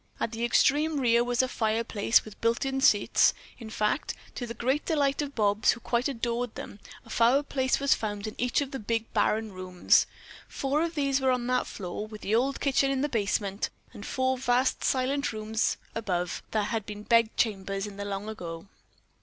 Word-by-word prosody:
At 230 - -1
the 230 0 -4
extreme 295 +5 +3
rear 235 -2 +4
was 245 +1 +1
a - - 0
fireplace 225 -2 +1
with 215 -1 -12
built 230 +3 +1
in 270 0 -1
seats. 210 -8 +4 0.2
In 225 -2 -8
fact, 215 +5 -1 0.2
to 245 - -5
the 230 - -6
great 265 +5 0
delight 285 -3 +1
of 285 -1 -5
Bobs, 210 -1 +3
who 240 - -10
quite 240 +2 0
adored 240 -2 -2
them, 205 - -8 0.3
a - - -16
fireplace 260 +3 +2
was 280 0 +4
found 205 -1 -3
in 215 - -5
each 245 +3 +1
of 280 -1 -4
the 270 - -4
big 225 +1 -2
barren 220 0 +1
rooms. 185 -1 +2 0.4
Four 280 +3 -1
of 335 0 -2
these 275 -2 +1
were 265 - +2
on 250 -1 +1
that 250 0 +1
floor, 200 +2 -5
with 215 -1 -10
the 205 - -2
old 265 +4 +1
kitchen 275 0 +2
in 270 -1 0
the 295 - 0
basement, 200 -3 -1 0.2
and 205 - -9
four 260 +2 0
vast 250 +1 +1
silent 275 +2 +1
rooms 220 +1 -1 0.2
above, 180 -6 -2
that 215 -1 0
had 225 -2 -2
been 210 0 -7
bed 230 0 +3
chambers 195 -2 -1
in 205 -1 -9
the 200 - -4
long 200 +1 -4
ago. 170 -6 -6
235 Hz, 195 wpm, -28 LUFS, 210-265 Hz, 0.4 s, rear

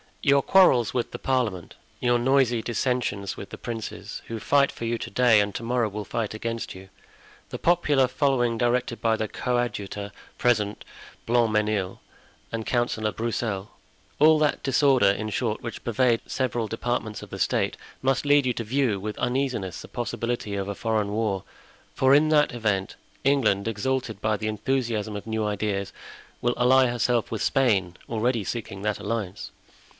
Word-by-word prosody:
"Your 140 -1 +5
quarrels 135 - +5
with 120 - -1
the - - -6
parliament, 115 -10 -1 0.3
your 120 0 +3
noisy 125 -2 +3
dissensions 120 -5 -1
with 100 - -8
the - - -8
princes, 115 -2 -6
who 115 -1 -4
fight 140 +5 +3
for 115 - -6
you 115 +1 0
to - - -5
day 120 -1 +5
and 100 0 0
to - - -4
morrow 120 -1 +1
will 105 +1 -5
fight 115 -3 -3
against 115 +1 -4
you, 95 +1 -12 0.6
the - - -6
popular 150 -6 +3
following 125 -3 +1
directed 120 0 0
by 115 -1 +3
the 110 -1 -2
coadjutor, 105 -6 -2 0.3
President 105 -4 +1 0.4
Blancmesnil, 110 -5 +1 0.5
and 115 -1 -3
Councillor 120 -3 0
Broussel—all 115 +7 0
that 150 -1 +1
disorder, 135 -4 +4
in 110 +2 -1
short, 110 +1 -1
which 115 - -7
pervades 120 0 +2
the - - -26
several 120 -3 -1
departments 115 -1 -3
of - - -11
the - - -6
state, - - 0 0.3
must 135 +2 +1
lead 145 -1 +4
you 125 - +1
to 115 - -4
view 120 -3 0
with 105 +2 -5
uneasiness 125 -8 -1
the - - -10
possibility 120 -3 -3
of 100 0 -3
a 100 - -3
foreign 110 -2 -1
war; 105 -3 -1 0.5
for 130 +1 +4
in 155 +2 +4
that 150 -3 +3
event 105 -5 -1 0.3
England, 120 -8 +2
exalted 115 -1 -2
by 110 0 +1
the 110 - -3
enthusiasm 110 -1 -1
of 100 - -7
new 110 -1 -1
ideas, 105 -1 -2 0.5
will 120 0 +1
ally 130 +2 +5
herself 120 -1 0
with 110 - -2
Spain, 100 -10 +2
already 115 0 0
seeking 105 -2 -5
that 105 0 -1
alliance. 100 - -4
115 Hz, 165 wpm, -25 LUFS, 105-125 Hz, 0.6 s, Your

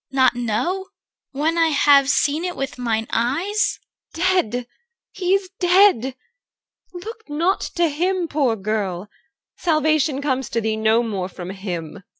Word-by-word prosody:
CHR. 270 - -12
Not 260 -2 +4
know? 245 - -1 0.5
when 310 +4 0
I 330 - +5
have 285 -2 +4
seen 295 +3 +2
it 360 -1 -3
with 270 -2 -5
mine 225 -2 -1
eyes? 330 - 0 0.4
EL. 370 +1 +3
Dear, 245 +2 -4 0.5
he 370 0 +1
is 385 -2 -3
dead. 355 - +4 0.8
Look 435 +3 -9
not 335 +6 +1
to 345 -1 +3
him, 350 +4 -1
poor 280 -6 +1
girl! 200 -2 -3 0.5
Salvation 310 -3 +1
comes 265 -3 -1
to 230 - -1
thee 220 0 -1
no 220 +2 +2
more 195 -5 -3
from 180 0 -7
him. 190 -2 -6
280 Hz, 150 wpm, -21 LUFS, 225-350 Hz, 0.8 s, I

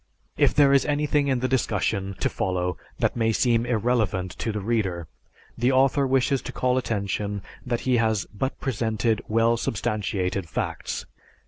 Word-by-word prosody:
If - - +3
there 140 -2 +6
is 140 - +5
anything 145 -1 +1
in 130 -3 +1
the 130 - +1
discussion 105 -6 0
to - - +3
follow 90 -1 -1 0.2
that - - 0
may 115 -1 +2
seem 120 +1 +2
irreverent 110 -6 0
to 115 - -1
the 105 - -3
reader, 95 -6 -1 0.5
the 120 +3 +2
author 135 +1 +3
wishes 135 0 +2
to - - -6
call 125 0 +1
attention 100 -3 -2 0.2
that 120 -1 -1
he 130 -2 +2
has 110 -3 +1
but 130 +6 -3
presented 115 -3 0
well 115 +1 +3
substantiated 100 -5 -2
facts. - - -3
115 Hz, 155 wpm, -25 LUFS, 100-130 Hz, 0.5 s, there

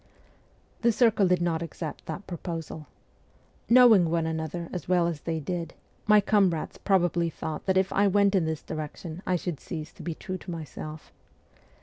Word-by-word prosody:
The 235 0 +4
circle 220 -4 +3
did 180 -1 +2
not 165 -2 0
accept 165 -1 -6
that 165 +5 -5
proposal. 165 -3 -6 0.8
Knowing 230 -8 +7
one 165 0 +1
another 160 +1 -3
as 180 -1 -5
well 180 -2 +4
as 165 -3 -2
they 165 -1 -2
did, 170 +1 -4 0.3
my 210 0 +7
comrades 195 -6 +1
probably 175 -3 +2
thought 155 +1 -6
that 190 0 +3
if 190 0 +1
I 200 +1 +4
went 200 0 +3
in 185 -4 +3
this 160 -1 -3
direction 155 +2 -6
I 185 - +2
should 175 -4 -3
cease 160 -2 -7
to - - -13
be 170 -2 -4
true 185 +2 -6
to - - -11
myself. 155 -1 -7
175 Hz, 175 wpm, -27 LUFS, 160-190 Hz, 0.8 s, Knowing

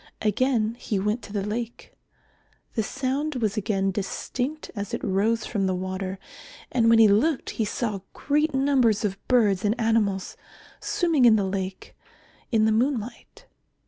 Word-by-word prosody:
Again 225 +1 +1
he 210 - -2
went 210 +5 -1
to - - -11
the 200 -1 -2
lake. 230 +2 -5 0.8
The 225 - 0
sound 275 +6 -2
was 220 -4 0
again 195 -2 0
distinct 250 +9 -4
as 200 -1 -3
it - - -7
rose 215 +3 +1
from 195 -4 -1
the 185 - 0
water, 185 +1 -4 0.5
and 230 -2 +3
when 230 - +6
he 225 -1 +8
looked 250 +9 +2
he 220 - -1
saw 210 -2 -2
great 300 +2 0
numbers 265 -6 +2
of 195 -1 -2
birds 210 -6 +3
and 215 +4 0
animals 220 -4 +1 0.4
swimming 345 - +2
in 230 -2 +7
the 205 -2 +1
lake 190 0 -4 0.6
in 220 -2 +3
the 220 - +3
moonlight. 240 0 -2
220 Hz, 155 wpm, -25 LUFS, 200-255 Hz, 0.8 s, he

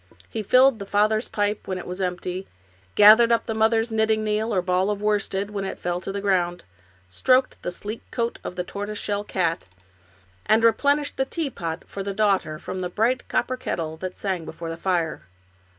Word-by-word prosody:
He 225 - -4
filled 255 +3 +5
the 200 - -7
father's 215 +3 +2
pipe 205 0 -1
when 185 - -2
it 180 - -7
was 180 +2 -5
empty, 180 +1 -3 0.5
gathered 220 +3 +8
up 230 - +2
the 225 - -2
mother's 225 +1 +2
knitting 220 0 +2
needle, 215 +1 0
or 185 -4 +1
ball 185 +2 +1
of 205 -1 -1
worsted, 205 -1 0
when 200 -1 -3
it 190 - -4
fell 175 0 -2
to 195 - -5
the 200 - -3
ground, 180 -3 0 0.4
stroked 255 - +2
the - - -3
sleek 210 +5 -6
coat 235 -1 -2
of - - -6
the 180 - -2
tortoise 205 +3 -5
shell 205 0 -2
cat, 170 - -1 0.8
and 220 +2 +4
replenished 285 +6 +2
the 265 - +1
teapot 200 - -4
for 200 - -7
the 195 0 -4
daughter 195 -7 +1
from 185 +3 -6
the 180 - -2
bright 235 +7 0
cop - - 0
per 255 - -1
kettle 160 -9 -3
that 185 +2 -5
sang 190 -4 -2
before 165 +1 -6
the - - -4
fire. 170 -2 -1
205 Hz, 200 wpm, -24 LUFS, 180-220 Hz, 0.8 s, gathered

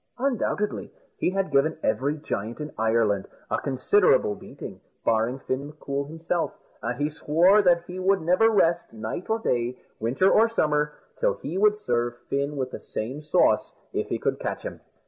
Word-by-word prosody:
Undoubtedly 240 -5 -1 0.3
he - - +2
had 195 -3 -1
given 140 +3 +3
every 145 +4 +1
giant 115 -6 -4
in 150 0 -5
Ireland 110 -3 +1 0.2
a - - +1
considerable 140 - +3
beating, - - -10 0.2
barring 115 +3 +2
Fin 135 +1 -3
M'Coul 140 -2 -4
himself; 165 +2 -2 0.2
and 120 +1 -3
he 145 - +2
swore 165 +6 +4
that 175 -3 +4
he 180 +1 -7
would 190 +1 +3
never 180 +7 +4
rest, 175 -5 +2
night 115 - -5
or 220 - +2
day, 125 - -1 0.2
winter 130 - +2
or 225 +1 +5
summer, 150 -8 +1 0.3
till - - +2
he 160 - -6
would 210 +2 +4
serve 120 - -1
Fin 140 +1 0
with 130 -1 -2
the - - -6
same 130 +7 -5
sauce, 150 - +2 0.2
if - - -1
he - - -1
could - - -1
catch - - -3
him. - - -7
150 Hz, 170 wpm, -26 LUFS, 125-185 Hz, 0.3 s, or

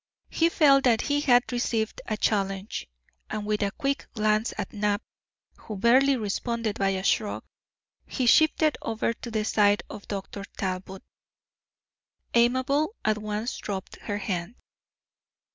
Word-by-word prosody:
He 330 +1 +3
felt 275 -5 +5
that 235 -3 +4
he 290 0 0
had 245 -3 +4
received 230 -3 -1
a 215 - -1
challenge, 195 - -1 0.4
and 215 -1 -4
with 210 0 -1
a 200 - +2
quick 275 +7 -2
glance 215 +1 +1
at 205 -2 -4
Knapp, 210 0 0 0.5
who 215 - -8
barely 260 +6 +4
responded 225 0 -2
by 195 -1 +2
a 190 -1 -2
shrug, 205 +1 0 0.6
he 255 - -2
shifted 310 +3 +4
over 225 +1 -1
to 235 - -9
the 215 -2 -1
side 205 -1 +3
of 205 - -9
Dr. 200 0 -5
Talbot. 190 -1 -4 1.3
Amabel 260 - +2
at 215 0 +2
once 215 +3 -3
dropped 195 -2 -5
her 205 - -4
hand. 190 +1 -3
215 Hz, 140 wpm, -26 LUFS, 205-245 Hz, 1.3 s, felt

